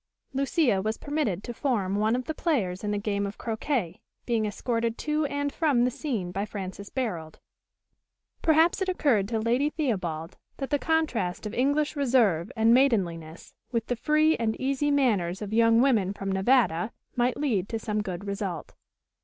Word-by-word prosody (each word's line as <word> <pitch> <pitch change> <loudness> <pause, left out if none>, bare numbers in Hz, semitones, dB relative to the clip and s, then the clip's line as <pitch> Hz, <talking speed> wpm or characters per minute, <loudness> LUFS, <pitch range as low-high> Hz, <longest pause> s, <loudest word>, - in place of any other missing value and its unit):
Lucia 270 - +2
was 220 +2 -2
permitted 285 - -2
to 240 - -5
form 215 -8 -1
one 215 +3 +2
of 250 0 -3
the 315 - -3
players 215 - -1
in 210 - -1
the 205 - 0
game 200 -1 -1
of 200 - -8
croquet, 220 - -2 0.2
being 225 -3 +1
escorted 230 +2 -2
to 305 0 0
and 285 0 -2
from 290 -8 +2
the 250 - +1
scene 225 - -3
by 195 +3 -2
Francis 200 -1 -6
Barold. 180 -12 -3 1.1
Perhaps 325 +4 +4
it 380 - 0
occurred 255 - +2
to 225 +1 -1
Lady 240 +6 +1
Theobald 180 - -3 0.2
that 270 +1 -5
the 290 - +2
contrast 255 - 0
of 210 - -4
English 285 +4 +1
reserve 235 - +2
and 225 +1 +4
maidenliness 180 - +1 0.2
with 230 -2 -1
the 245 - -1
free 305 +5 +3
and 225 -2 -1
easy 275 +2 0
manners 210 -11 +1
of 210 0 -5
young 230 +1 +5
women 215 -8 +2
from 195 -1 -4
Nevada 195 -2 +2 0.2
might 245 0 +1
lead 225 -10 0
to 225 - -2
some 215 -1 -2
good 190 -1 -5
result. 200 -4 -4
230 Hz, 170 wpm, -27 LUFS, 200-275 Hz, 1.1 s, young